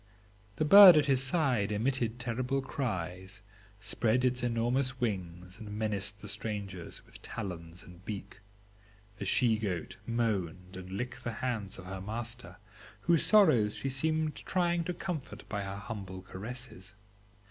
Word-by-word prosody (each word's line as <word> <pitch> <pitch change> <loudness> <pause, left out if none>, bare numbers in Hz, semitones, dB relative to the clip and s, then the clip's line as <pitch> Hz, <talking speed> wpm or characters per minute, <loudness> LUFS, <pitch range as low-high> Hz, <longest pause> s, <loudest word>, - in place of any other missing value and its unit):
The 155 - 0
bird 190 0 +11
at 150 - +4
his 135 -2 +3
side 135 - +2
emitted 120 +1 0
terrible 125 +3 -1
cries, 95 -7 -4 0.4
spread 110 +3 +1
its 125 -1 +1
enormous 125 +2 0
wings, 90 -4 -4
and 110 -2 -8
menaced 105 -1 -2
the - - -6
strangers 100 -4 -5
with - - -15
talons 85 -2 -6
and 90 0 -15
beak. 100 -1 -7 0.8
The 100 - -3
she 110 +2 +3
goat 95 -6 -3
moaned 95 -6 -2
and 95 0 -8
licked 125 +6 -5
the 120 - -3
hands 110 -5 -3
of 95 - -10
her 95 0 -6
master, 110 -2 -5 0.4
whose 170 -2 +3
sorrows 155 - +5
she 135 - -3
seemed 155 +3 0
trying 175 -2 0
to 180 - -2
comfort 160 - -5
by 105 -1 -3
her 100 0 -5
humble 100 -4 -7
caresses. 105 -1 -7
110 Hz, 145 wpm, -31 LUFS, 95-130 Hz, 0.8 s, bird